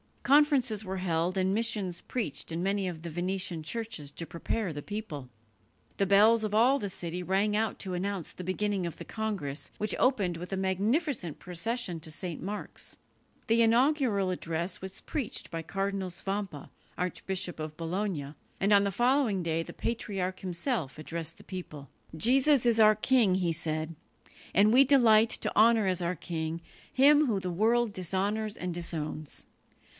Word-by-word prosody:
Conferences 270 -7 +4
were 190 0 -3
held 175 0 0
and 190 0 +2
missions 210 -5 -1
preached 215 - -3
in 165 +2 -2
many 195 0 0
of 170 -3 -5
the 170 - -6
Venetian 175 0 -2
churches 190 -5 -5
to 165 - -5
prepare 180 +4 -3
the 145 -1 -5
people. 160 - -6 0.7
The 200 - +2
bells 215 +3 +6
of 210 -1 -1
all 255 +5 +5
the 205 - -3
city 175 -1 -3
rang 195 +3 +1
out 220 +1 0
to 190 -2 -4
announce 190 -1 -3
the 185 - -8
beginning 190 +1 -1
of 170 - -7
the - - -8
congress, 200 -10 -3
which 215 -1 -1
opened 200 -10 +2
with 180 +3 -6
a - - -1
magnificent 195 - 0
procession 180 +1 -3
to 160 - -7
St. 165 0 -4
Mark's. 205 +4 -5 0.5
The 230 +1 +4
inaugural 230 -4 +3
address 170 +1 -3
was 190 0 -8
preached 280 -9 -4
by 165 -1 -3
Cardinal 195 +1 -2
Svampa, 195 -3 -4 0.3
Archbishop 180 0 -3
of 155 0 -5
Bologna; 165 -4 -3 0.3
and 200 +2 +3
on 200 0 +6
the 200 - 0
following 240 -3 +2
day 165 0 0
the - - -10
patriarch 195 -5 -3
himself 180 - -2
addressed 165 +1 -5
the - - -14
people. 155 -7 -8 0.3
"Jesus 260 - +4
is 230 -2 +4
our 215 -1 +7
king," 215 -3 +3
he 180 -3 +1
said, 160 0 -1 0.6
"and 205 +3 +5
we 265 +2 +9
delight 230 -5 +5
to - - -1
honour 225 0 +5
as 185 -1 +1
our 175 +1 -1
king 160 0 -4 0.3
Him 290 +3 +6
whom 205 -5 0
the 180 -1 -3
world 225 +5 +2
dishonours 200 +4 -1
and 180 -1 -4
disowns. 155 -3 -4
190 Hz, 165 wpm, -29 LUFS, 170-220 Hz, 0.7 s, we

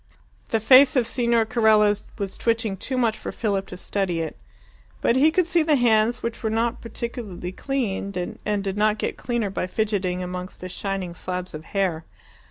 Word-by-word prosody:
The 225 - +1
face 260 +6 +7
of 250 -3 +3
Signor 235 -2 +2
Carella 220 -3 +4 0.2
was 195 -2 -3
twitching 225 -3 0
too 260 +7 -3
much 230 -3 +1
for - - -5
Philip 200 -4 -1
to 180 - -8
study 185 -3 -1
it. 160 -1 -3 0.6
But 235 - +2
he 285 +4 +5
could 350 +2 +2
see 340 0 +2
the 310 -1 +3
hands, 230 -2 +3
which 230 0 -3
were 220 - 0
not 230 +2 0
particularly 230 -6 -5
clean, 200 -7 -3
and 210 -1 -1
did 195 0 -3
not 215 +1 +3
get - - -2
cleaner 235 -5 -2
by 185 - -2
fidgeting 190 -3 -1
amongst 180 +1 -6
the 185 - -6
shining 190 -1 -3
slabs 180 +1 -5
of 155 0 -8
hair. 185 -5 -1
215 Hz, 180 wpm, -24 LUFS, 190-235 Hz, 0.6 s, face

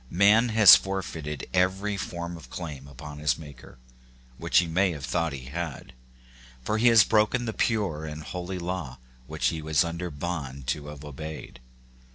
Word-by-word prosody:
Man 105 +6 +4
has 110 -4 +9
forfeited 85 -6 -4
every 95 +3 +1
form 85 -3 -5
of 75 -7 -12
claim 70 0 -7
upon 75 +2 -10
his 75 -4 +1
Maker, 70 -5 -13 0.6
which - - +1
he 90 - +5
may 90 +2 +1
have 70 -4 -6
thought 85 -2 -1
he 65 -3 -7
had; 75 +1 -6 0.7
for 105 +11 -1
he 120 - +4
has 115 -2 +8
broken 110 +3 +2
the 110 - -3
pure 100 -11 0
and 75 0 -7
holy 90 +3 -5
law 85 -7 -4 0.3
which 80 +1 0
he 80 -2 -4
was 80 +2 +2
under 85 +1 -4
bond 70 -4 -5
to 75 +2 -2
have 75 0 -9
obeyed. 75 -2 -8
85 Hz, 170 wpm, -26 LUFS, 75-95 Hz, 0.7 s, has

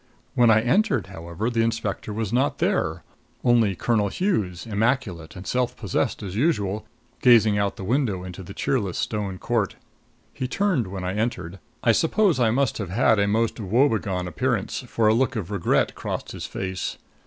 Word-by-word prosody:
When 120 -2 +4
I 110 0 +6
entered, 130 - +2
however, 85 +7 -4
the 115 -1 +1
inspector 115 -2 -2
was 110 0 -3
not 130 +4 +1
there - - 0 0.4
only 115 -5 +3
Colonel 110 +1 +1
Hughes, 100 - -1
immaculate 105 -7 -1
and 90 +1 -9
self 125 +2 -1
possessed, 100 -2 -1
as 95 -1 -5
usual, 110 - 0 0.3
gazing 110 -4 +5
out 100 -1 0
the - - -8
window 110 -4 0
into 90 +1 -8
the 95 +2 -10
cheerless 100 -10 -1
stone 100 -4 -2
court. 110 0 -1 0.6
He 130 - -3
turned 165 - 0
when 95 0 -6
I 90 +1 -2
entered. 105 -4 -3 0.2
I 115 - +5
suppose 165 - +2
I 120 -2 +4
must 130 +1 +1
have 100 -5 -4
had 110 +2 +3
a 100 - +2
most 115 +3 0
woebegone 105 -4 +1
appearance, 85 - -1
for 110 -2 +1
a 110 - +5
look 130 +3 +1
of 105 -3 -4
regret 100 -4 +1
crossed - - -5
his - - -6
face. 95 -1 -4
110 Hz, 175 wpm, -24 LUFS, 95-120 Hz, 0.6 s, I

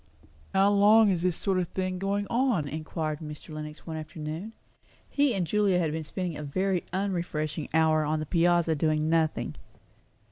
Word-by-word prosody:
"How 195 +1 +4
long 205 +1 +6
is 175 -3 0
this 180 -1 +1
sort 190 -2 0
of 180 - -1
thing 185 +1 -3
going 200 +1 -1
on?" 235 - +1
inquired 155 0 -3
Mr. 150 0 -9
Lenox 150 0 -8
one 160 -1 -5
afternoon. 155 +6 -6 0.5
He 280 -5 +2
and 185 -3 0
Julia 200 +1 +2
had 165 -4 +1
been 160 0 -4
spending 180 0 -4
a 150 - -6
very 185 +5 0
unrefreshing 170 -5 -2
hour 155 -1 +3
on 155 +1 0
the 155 - -3
piazza 170 0 +3
doing 155 +1 +1
nothing. 160 -2 0
170 Hz, 170 wpm, -28 LUFS, 155-195 Hz, 0.5 s, long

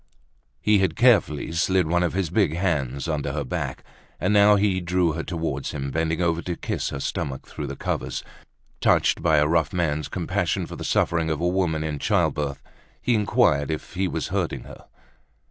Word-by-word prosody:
He 105 -1 +3
had 95 -4 +1
carefully 105 - +3
slid 90 +2 +2
one 85 +2 +1
of 90 -2 0
his 95 -4 -1
big 95 -6 +2
hands 75 -7 -1
under 75 -4 -2
her 75 -1 -2
back, 65 - -4 0.4
and 105 - +1
now 105 0 +6
he 100 -2 +1
drew 90 -1 +1
her 80 +2 -3
toward 80 -5 -3
him, 70 -2 -4
bending 80 +3 0
over 85 -1 +1
to 90 -1 -3
kiss - - -3
her 70 - -5
stomach 65 -1 -3
through 75 - -6
the 70 - -5
covers, - - -3 0.6
touched - - +3
by 80 -2 +3
a 75 - +4
rough 80 -1 +1
man's 75 -4 -1
compassion - - -1
for - - -8
the - - -7
suffering 80 -2 +1
of 80 -2 -1
a 85 - +1
woman 90 -4 0
in 75 -2 -3
childbirth. 70 -2 0 0.4
He 125 - +1
inquired 100 -9 +2
if 80 -1 -4
he 95 +1 0
was - - -3
hurting - - -2
her. - - -13
80 Hz, 190 wpm, -24 LUFS, 75-90 Hz, 0.6 s, now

